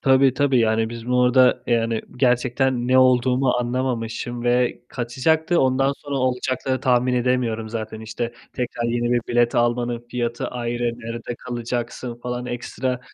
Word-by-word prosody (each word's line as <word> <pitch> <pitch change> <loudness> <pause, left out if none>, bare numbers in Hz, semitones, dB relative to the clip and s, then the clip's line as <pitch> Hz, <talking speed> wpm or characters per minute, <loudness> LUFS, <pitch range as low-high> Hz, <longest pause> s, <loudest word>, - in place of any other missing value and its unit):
Tabii 135 -1 +4
tabii. 140 -2 +2
Yani 110 -1 +2
biz 115 0 -8
bu 125 0 +3
arada 125 0 +4
yani 115 -1 +1 0.2
gerçekten 125 0 +1
ne 130 0 +5
olduğumu 130 0 +4
anlamamışım 120 -1 -2
ve 125 0 +1
kaçacaktı, 155 +8 +1
ondan 135 +1 +2
sonra 145 -1 -5
olacakları 130 0 -1
tahmin 125 -1 +2
edemiyorum 120 -3 0
zaten. 110 -1 -5
İşte 115 +2 -4 0.2
tekrar 120 -1 -3
yeni 120 0 0
1 120 - +3
bilet 120 0 +2
almanın 120 0 0
fiyatı 120 -1 -2
ayrı, 120 0 -3
nerede 115 +1 -6
kalacaksın 120 0 -4
falan, 125 0 -4
ekstra 125 +1 -3
125 Hz, 140 wpm, -22 LUFS, 120-130 Hz, 0.2 s, ne